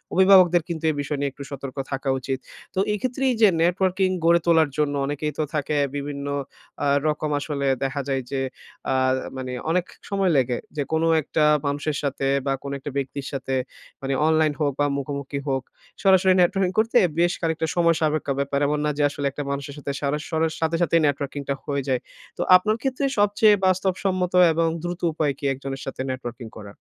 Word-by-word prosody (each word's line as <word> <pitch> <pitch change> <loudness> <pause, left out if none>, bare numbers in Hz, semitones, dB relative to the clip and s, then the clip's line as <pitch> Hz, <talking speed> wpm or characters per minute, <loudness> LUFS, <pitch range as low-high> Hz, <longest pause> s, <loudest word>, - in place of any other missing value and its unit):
অভিভাবকদের 190 -1 +7 0.2
কিন্তু 165 -2 -4
এ - - -4
বিষয় 145 +1 -3
নিয়ে 140 -1 -1
একটু 140 - -9
সতর্ক 140 0 -7
থাকা 135 0 -2
উচিত। 130 +1 -3 0.3
তো 185 - -1
এই - - -1
ক্ষেত্রে 255 +1 -2
এই - - -1
যে 215 - +8
networking 185 +2 +2
গড়ে 170 +1 +5
তোলার 160 -3 +4
জন্য 145 -1 +1
অনেকেই 145 +1 -2
তো 155 - +1
থাকে 150 0 -1 0.2
বিভিন্ন 140 0 -4 0.6
আ - - +2 0.2
রকম 150 0 -1
আসলে 140 -1 -2 0.2
দেখা 135 +1 -1
যায় 135 -1 0
যে 135 - -1 0.5
আ - - +2 0.4
মানে 130 -1 -5 0.2
অনেক 180 0 +1 0.2
সময় 195 -3 +1
লাগে। 125 -2 +1 0.2
যে 145 - +1
কোন 160 +1 +2 0.2
একটা 150 +2 0 0.2
মানুষের 145 +1 -1
সাথে 140 -1 -1 0.2
বা 135 - +1
কোন 140 - -5
একটা 140 - -6
ব্যক্তির 140 0 -4
সাথে। 135 -1 -3 0.5
মানে 135 0 -2
অনলাইন 155 -1 +3
হোক 145 -2 +1
বা 145 - +3
মুখোমুখি 140 0 -4
হোক, 135 -1 0 0.4
সরাসরি 190 -1 +5
networking 185 +1 +2
করতে 225 +1 +3 0.2
বেশ 175 +1 +4
খানিকটা 160 -1 0
সময় 170 -2 +3
সাপেক্ষ 155 -1 0
ব্যাপার। 140 0 0
এমন 150 0 0
না 150 - +1
যে 150 - +2
আসলে 145 0 -5
একটা 145 - -5
মানুষের 140 0 -5
সাথে 145 -1 -4
সারা 145 +1 0
সরার 160 -1 0
সাথে 160 +1 +1
সাথেই 165 -1 +3
networking 140 0 -2
টা - - +2
হয়ে 140 -1 -1
যায়। 130 -2 0 0.4
তো - - -3
আপনার 210 +4 +3
ক্ষেত্রে 270 +1 -1
সবচেয়ে 205 +1 +5
বাস্তবসম্মত 185 -1 0 0.2
এবং 165 +1 +1 0.2
দ্রুত 175 0 -4
উপায় 150 -3 0
কি - - -20
একজনের 135 0 -6
সাথে 135 - -5
networking 120 -3 -7
করার? 105 -2 -9
150 Hz, 190 wpm, -24 LUFS, 140-175 Hz, 0.6 s, যে